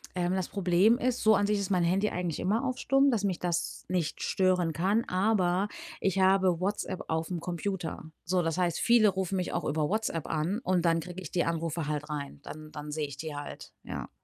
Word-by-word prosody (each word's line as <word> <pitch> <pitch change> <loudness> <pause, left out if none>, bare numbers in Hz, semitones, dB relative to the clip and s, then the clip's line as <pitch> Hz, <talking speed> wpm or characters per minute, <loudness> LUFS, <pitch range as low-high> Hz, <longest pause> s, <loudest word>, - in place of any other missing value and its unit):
Ähm, 180 0 0
das 190 -1 -1
Problem 195 +4 +3
ist, 250 0 0
so 220 0 +6
an 205 - +3
sich 210 0 +1
ist 200 -1 -3
mein 180 -3 +3
Handy 195 +5 +2
eigentlich 175 -3 -3
immer 215 +7 +1
auf 255 -1 -2
Stumm, 275 +1 +4
dass 220 -5 0
mich 190 -3 0
das 170 -1 -2
nicht 175 -4 -1
stören 180 -3 +2
kann, 195 - +1
aber 185 0 +2 0.3
ich 195 0 0
habe 190 -2 +4
WhatsApp 190 -1 -2
aufm 160 +2 -2
Computer. 175 0 -4 0.2
So, 180 +1 +1
das 165 +1 -1
heißt, 175 -2 +1
viele 235 -3 +5
rufen 190 0 -1
mich 180 -1 -2
auch 175 - -2
über 150 0 0
WhatsApp 200 -6 -1
an 165 +7 -1
und 185 -6 +1
dann 165 -1 +3
kriege 180 +3 -8
ich 160 - -8
die 175 - +1
Anrufe 165 -1 -2
halt 150 0 -3
rein. 145 -2 -5
Dann 155 +1 -9
dann 150 0 -7
sehe 150 0 -1
ich 140 -1 -9
die 155 +1 -5
halt, 145 0 -8
ja. - - -6
180 Hz, 215 wpm, -29 LUFS, 165-195 Hz, 0.3 s, so